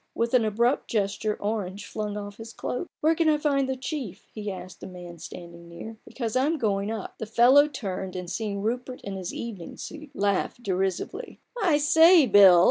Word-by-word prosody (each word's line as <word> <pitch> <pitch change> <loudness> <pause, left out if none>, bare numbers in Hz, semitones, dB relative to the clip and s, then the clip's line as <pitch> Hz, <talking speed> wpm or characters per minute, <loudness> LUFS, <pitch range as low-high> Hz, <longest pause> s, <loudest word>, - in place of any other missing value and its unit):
With 230 +1 -1
an 250 -3 +5
abrupt 235 +5 +1
gesture 210 0 -1
Orange 205 -2 -3
flung 210 -1 -4
off 205 0 -7
his 225 0 -9
cloak, 340 +8 -4
"Where 315 +2 +4
can 325 -1 +2
I 305 - +4
find 280 -3 +1
the 265 - 0
chief?" 260 - -6
he 210 -1 -5
asked 185 -1 -9
a - - -7
man 175 -2 -10
standing 170 +1 -10
near, 220 +6 -9
"because 230 -3 -4
I'm 290 +6 +2
going 200 -5 0
up!" - - -1
44 - - -2
A - - -3
BOOK - - -4
OF - - -9
BARGAINS. - - -11
The - - -25
fellow 265 +5 +7
turned, 195 -9 -5
and 180 -1 -5
seeing 205 -2 -3
Rupert 245 +3 -3
in 200 -1 -6
his 185 -2 -5
evening 205 -8 -7
suit, 305 -1 -8
laughed 200 +3 0
derisively. 195 - -2
" - - -49
I 340 -7 +4
say, 320 +2 +6
Bill 195 -5 +8
220 Hz, 215 wpm, -26 LUFS, 195-265 Hz, -, Bill